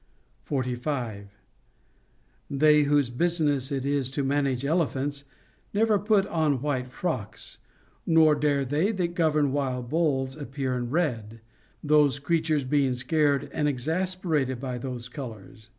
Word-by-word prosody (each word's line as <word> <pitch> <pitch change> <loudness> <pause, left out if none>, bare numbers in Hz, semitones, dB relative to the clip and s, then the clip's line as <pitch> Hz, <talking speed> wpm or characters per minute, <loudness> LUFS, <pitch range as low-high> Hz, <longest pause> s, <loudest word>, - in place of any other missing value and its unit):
45. 125 -6 -3 1.2
They 150 +1 +4
whose 145 -3 +2
business 145 -2 +1
it 135 -1 -2
is 140 -2 +1
to 140 +1 -2
manage 135 -1 0
elephants 145 -2 -1 0.5
never 215 -1 +3
put 205 -1 +2
on 155 -7 0
white 130 -4 -1
frocks, 110 - -4 0.5
nor 160 -2 +6
dare 145 -2 +1
they 150 - +1
that 175 -3 -1
govern 155 -5 +2
wild 130 -3 -2
bulls 140 -5 0
appear 135 -3 -3
in 120 -1 -3
red, 115 -8 -1 0.4
those 150 -2 +4
creatures 155 0 0
being 135 -1 +1
scared 145 +2 +1
and 150 - 0
exas 165 +8 -1
perated 145 -8 0
by 125 -2 -4
those 125 -2 -5
colors. 125 -3 -9
140 Hz, 130 wpm, -26 LUFS, 130-155 Hz, 1.2 s, nor